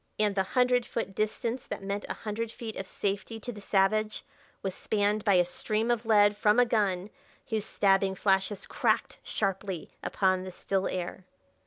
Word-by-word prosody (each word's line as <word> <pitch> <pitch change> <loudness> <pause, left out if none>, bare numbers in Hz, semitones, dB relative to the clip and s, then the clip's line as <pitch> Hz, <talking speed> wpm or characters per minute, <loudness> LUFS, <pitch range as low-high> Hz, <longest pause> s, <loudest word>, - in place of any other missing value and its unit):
And 210 -1 +2
the 195 - +2 0.2
hundred 250 0 +4
foot 225 -4 -4
distance 225 +4 -2
that - - -5
meant 200 +1 -3
a - - -2
hundred 220 +1 -4
feet 225 -2 -7
of 190 - -5
safety 205 +4 -3
to 245 +3 -5
the 210 -3 -10
savage 215 +2 +1 0.4
was 190 -1 -2
spanned 205 +1 0
by 200 -4 +4
a 180 -1 +5
stream 215 +6 -1
of 235 -1 -1
lead 205 -2 +5
from 210 +2 +4
a 245 - +6
gun 205 -4 0 0.4
whose 220 -2 -1
stabbing 195 -1 +3
flashes 195 +1 +1
cracked - - 0
sharply 195 -3 -2
upon 185 -1 +1
the 185 - -6
still 190 +1 -1
air. 185 +1 -4
205 Hz, 175 wpm, -29 LUFS, 195-220 Hz, 0.4 s, a